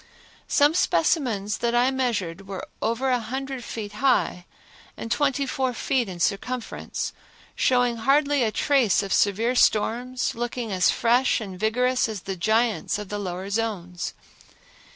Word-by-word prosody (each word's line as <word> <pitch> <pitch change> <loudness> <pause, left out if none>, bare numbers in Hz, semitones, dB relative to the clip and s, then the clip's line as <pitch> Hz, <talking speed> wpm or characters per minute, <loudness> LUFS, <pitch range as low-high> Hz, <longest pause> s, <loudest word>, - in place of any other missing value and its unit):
Some 290 +2 +4
specimens 245 - +1
that 235 0 0
I 245 +2 +3
measured 200 -9 -2
were 195 -1 -6 0.2
over 235 +4 0
a 250 - +2
hundred 265 +3 -5
feet 215 -3 -6
high 215 -7 +1 0.5
and 230 - -6
twenty 280 -1 +1
four 260 -1 -1
feet 245 -2 0
in 180 -2 -7
circumference, 230 +7 -2 0.4
showing 245 -2 +2
hardly 280 +4 +2
a 225 -3 +2
trace 250 - +2
of 195 - -2
severe 220 +5 +2
storms, 245 +2 +1
looking 240 -1 -4
as 185 -1 +3
fresh 245 +3 +2
and 190 -5 -7
vigorous 250 +3 +1
as 210 -4 -5
the 195 0 -4
giants 220 +5 +1
of 210 -2 -7
the 205 - -3
lower 190 0 -5
zones. 195 -5 -3
230 Hz, 145 wpm, -25 LUFS, 205-255 Hz, 0.5 s, Some